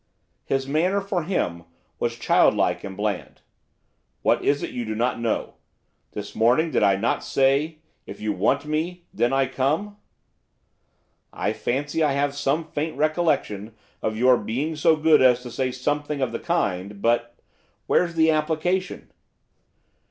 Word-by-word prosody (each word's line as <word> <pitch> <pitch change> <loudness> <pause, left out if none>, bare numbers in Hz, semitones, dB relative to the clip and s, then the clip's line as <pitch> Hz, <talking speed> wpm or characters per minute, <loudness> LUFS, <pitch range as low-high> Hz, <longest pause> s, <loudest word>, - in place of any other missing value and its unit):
His 135 0 -1
manner, 175 +8 +1
for 195 -2 -2
him, 85 - -2 0.4
was 120 0 -1
childlike 120 - +2
and 95 -1 -7
bland. 105 -2 -3 0.8
'What - - +2
is 145 0 +1
it - - -4
you 120 - -4
do 110 -1 -4
not 120 +3 0
know? 115 -1 -2 0.6
This 105 -1 -6
morning 125 +9 +3
did - - +1
I 100 -2 +4
not 115 +5 -1
say, 140 +4 +1 0.3
if - - -9
you 105 0 -1
want - - +1
me, 165 +4 -3
then 120 - +1
I 135 0 +2
come?' 150 +11 -1 1.4
'I 105 - -1
fancy 140 +8 -2
I 150 -3 +3
have 140 0 0
some 145 +3 0
faint 155 0 -4
recollection 150 - 0 0.3
of 110 0 -2
your 125 +1 +5
being 135 +10 -2
so 160 +1 +4
good 155 -1 +4
as 125 -1 +4
to 120 - -8
say 130 +1 -1
something 145 +3 -2
of 130 - 0
the - - -4
kind, 100 - -2
but 120 +2 0 0.5
where's 170 -2 +1
the 160 0 +4
application? 160 +4 -1
135 Hz, 150 wpm, -24 LUFS, 115-160 Hz, 1.4 s, your